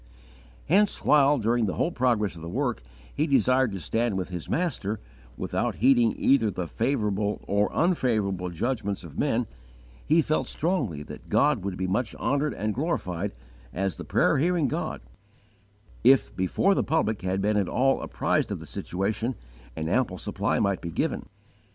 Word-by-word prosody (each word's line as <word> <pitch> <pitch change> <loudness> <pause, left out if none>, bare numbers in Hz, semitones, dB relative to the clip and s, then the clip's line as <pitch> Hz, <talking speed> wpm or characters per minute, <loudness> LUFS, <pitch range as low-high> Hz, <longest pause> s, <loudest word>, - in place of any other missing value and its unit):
'" - - -25
Hence, 200 +5 +2
while, 145 0 +5
during 115 -1 +1
the 95 - -2
whole 170 - 0
progress 115 - +1
of 85 - -10
the 85 - -6
work, 120 - -1 0.3
he 150 - 0
desired 130 -3 +3
to 95 - -4
stand 115 +5 -1
with 95 -1 -3
his 90 -3 -6
Master, 120 - -1 0.4
without - - -1
heeding 120 -2 +4
either 130 -5 +3
the 90 -3 -4
favourable 105 - -1
or 100 +1 +1
unfavourable 110 - +1
judgments 100 +2 -2
of 80 -3 -9
men, 125 -4 +1 0.6
he 160 +2 +3
felt 155 +1 0
strongly 140 - -1
that - - -11
God 140 -9 +3
would 100 -2 -3
be 95 - -2
much 105 +5 -1
honoured 145 +1 0
and 110 +1 -2
glorified 100 - -2 0.4
as 95 +4 -2
the - - -6
prayer - - +2
hearing 170 -1 +2
God - - -3 1.0
if, 130 +2 +4
before 95 - +2
the - - +1
public 110 -10 0
had 95 +1 -1
been 105 +2 +1
at 100 -3 +1
all 135 +2 +2
apprised - - 0
of - - -3
the - - -9
situation, 110 +7 -2 0.4
an 80 0 -3
ample 95 0 +1
supply 80 - -1
might 100 -1 +1
be 85 - -5
given. - - -2
110 Hz, 170 wpm, -26 LUFS, 95-135 Hz, 1.0 s, while